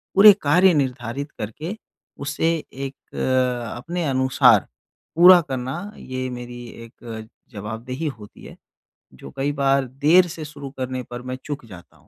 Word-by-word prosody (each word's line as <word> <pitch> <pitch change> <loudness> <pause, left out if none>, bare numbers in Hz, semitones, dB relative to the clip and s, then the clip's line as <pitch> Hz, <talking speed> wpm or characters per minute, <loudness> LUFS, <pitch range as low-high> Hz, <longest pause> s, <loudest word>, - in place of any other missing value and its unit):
पूरे 205 +1 +10
कार्य 180 +5 +5
निर्धारित 135 0 -2
करके 150 - -5 0.5
उसे 155 +3 0 0.2
एक 135 +1 -6 0.2
अ, 125 -3 0
अपने 170 +6 -3
अनुसार 130 0 +4 0.5
पूरा 180 +2 +9
करना 135 +7 -5
ये 130 0 -5
मेरी 120 0 -8 0.2
एक 115 -1 -9 0.2
जवाबदेही 115 +8 -5
होती 105 - -13
है - - -11 0.6
जो 65 - -11
कई 140 +2 0
बार 135 -1 +2 0.2
देर 180 +3 +6
से 160 -2 -7
शुरू 145 -2 -8
करने 130 0 -3
पर 120 0 -6
मैं - - -2
चूक 145 -4 -5
जाता 90 -6 -14
हूँ। - - -27
130 Hz, 145 wpm, -22 LUFS, 120-155 Hz, 0.6 s, पूरे